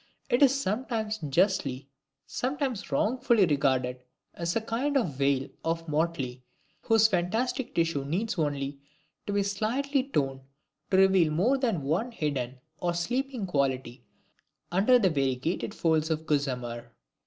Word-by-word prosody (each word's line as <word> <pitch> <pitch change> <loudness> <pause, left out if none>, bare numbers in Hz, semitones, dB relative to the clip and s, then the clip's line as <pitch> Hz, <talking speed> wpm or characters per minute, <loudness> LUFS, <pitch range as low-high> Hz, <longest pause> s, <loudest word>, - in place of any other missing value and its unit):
It 245 - +3
is 275 -1 +5
sometimes 220 -1 -2
justly, 145 -4 0 0.4
sometimes 260 -4 -3
wrongfully 235 -2 +3
regarded 130 -4 +1 0.3
as 170 0 -2
a 230 - +1
kind 255 +6 0
of 210 - 0
veil 135 0 +1 0.2
of 165 0 -2
motley, 150 -5 -1 0.4
whose 225 -1 +5
fantastic 220 +7 -1
tissue 165 -4 +1
needs 185 +8 -2
only 140 -2 -2 0.5
to 205 - -1
be 200 0 +2
slightly 240 +8 0
torn 135 - -1 0.5
to 190 - +3
reveal 190 -4 +5
more 225 - +2
than 225 - 0
one 180 - 0
hidden 135 - -3 0.2
or 175 -1 -1
sleeping 245 +5 -2
quality 130 -6 -1 0.7
under 205 +8 +5
the 195 -7 +3
variegated 135 +5 -1
folds 160 -1 +1
of 160 0 -1
gossamer. 125 -6 -2
170 Hz, 130 wpm, -28 LUFS, 140-225 Hz, 0.7 s, is